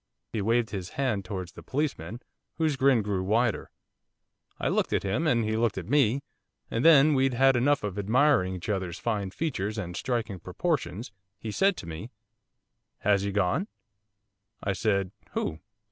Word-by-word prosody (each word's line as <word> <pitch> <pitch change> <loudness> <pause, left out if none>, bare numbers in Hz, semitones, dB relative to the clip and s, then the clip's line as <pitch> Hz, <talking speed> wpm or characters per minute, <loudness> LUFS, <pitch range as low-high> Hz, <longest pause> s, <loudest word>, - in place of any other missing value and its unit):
He 110 - -1
waved 115 +2 +1
his 95 -3 -4
hand 125 -8 0
towards 90 -1 -5
the - - -11
policeman, 125 - -3 0.3
whose 155 -3 +1
grin 130 -4 +4
grew 100 -2 -1
wider. 110 +4 +1 0.9
'I - - 0
looked - - 0
at - - +1
him, 110 +12 0
and 120 -6 +3
he 110 0 0
looked 115 -1 +1
at - - -5
me, 140 -2 +3 0.5
and 115 - 0
then 155 -2 +7
when 150 - +3
we'd 135 0 +2
had 135 +1 +5
enough 140 +3 +2
of 105 -1 -3
admiring 110 -3 +3
each 85 -3 -7
other's 95 -4 -2
fine 105 -5 -2
features 105 - -3
and 90 -4 -4
striking 115 -5 -2
proportions, 110 - -2 0.3
he 110 - -5
said 195 - +2
to 95 - -7
me, 85 +8 -6 0.9
"Has 100 -1 +3
he 100 0 -2
gone?" 105 - +1 1.0
I 100 - 0
said, 100 -2 0 0.2
"Who? 80 - -2
110 Hz, 170 wpm, -28 LUFS, 95-135 Hz, 1.0 s, then